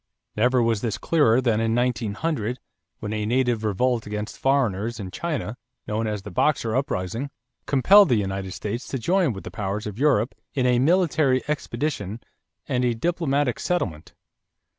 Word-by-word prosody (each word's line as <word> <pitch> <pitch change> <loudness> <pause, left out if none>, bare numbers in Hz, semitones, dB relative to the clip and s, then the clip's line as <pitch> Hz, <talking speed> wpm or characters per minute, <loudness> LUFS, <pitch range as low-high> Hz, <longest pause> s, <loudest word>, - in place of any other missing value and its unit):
Never 125 +3 +3
was 115 -2 +1
this 115 -4 -2
clearer 130 -7 +3
than 115 -4 +2
in 115 0 +1
1900 120 +1 -1 0.4
when 105 0 -3
a 105 -1 -2
native 120 0 +1
revolt 115 +3 0
against 105 0 -5
foreigners 120 -5 +1
in 95 -3 -6
China, 145 - -3 0.3
known 110 +1 -1
as 105 -2 -3
the 105 - -8
Boxer 115 - +1
uprising, 125 -1 -2 0.4
compelled 190 +8 +6
the 125 - +4
United 95 -2 -2
States 110 +5 -4
to 135 - -3
join 175 +5 +2
with 95 -3 -7
the - - -7
powers 105 0 -3
of 105 +1 -6
Europe 135 -5 +2 0.2
in 130 -3 +1
a 125 -1 +3
military 155 -4 +3
expedition 125 -7 -3 0.5
and 125 -1 0
a 120 -2 +1
diplomatic 145 -2 0
settlement. 95 - -2
120 Hz, 160 wpm, -24 LUFS, 105-135 Hz, 0.5 s, compelled